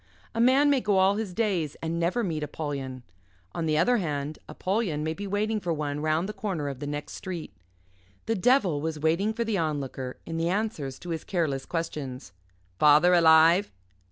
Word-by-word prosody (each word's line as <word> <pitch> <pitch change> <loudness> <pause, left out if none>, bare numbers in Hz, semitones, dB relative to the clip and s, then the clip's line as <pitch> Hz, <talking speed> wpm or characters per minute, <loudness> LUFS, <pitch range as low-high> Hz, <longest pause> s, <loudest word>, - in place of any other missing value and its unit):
A 230 - 0
man 270 +4 +5
may 275 -2 +3
go 205 -3 +2
all 190 +2 +4
his 215 -4 -3
days 180 -8 -1
and 165 +1 -3
never 180 +8 0
meet 160 -6 -2
Apollyon. 140 -4 -5 0.5
On 165 - -2
the 155 -1 +2
other 245 +10 +3
hand, 150 -5 -3
Apollyon 185 -6 -1
may 160 +1 -1
be 200 +4 -6
waiting 210 +2 0
for 175 -3 -3
one 150 -2 -2
round 155 +4 0
the 210 - -5
corner 190 -8 -3
of 135 -2 -7
the 145 - -5
next 145 0 -5
street. 180 -4 -6 0.7
The 225 - 0
devil 200 - +2
was 160 0 -3
waiting 165 +8 +1
for 235 +1 -2
the 220 -4 -1
Onlooker 140 -5 -3
in 165 - -4
the 165 +1 0
answers 180 - -2
to 175 - -8
his 160 - -3
careless 150 -8 -1
questions 140 - -5 0.5
"Father 150 +4 +6
alive? 165 +3 +6
165 Hz, 185 wpm, -27 LUFS, 150-205 Hz, 0.7 s, Father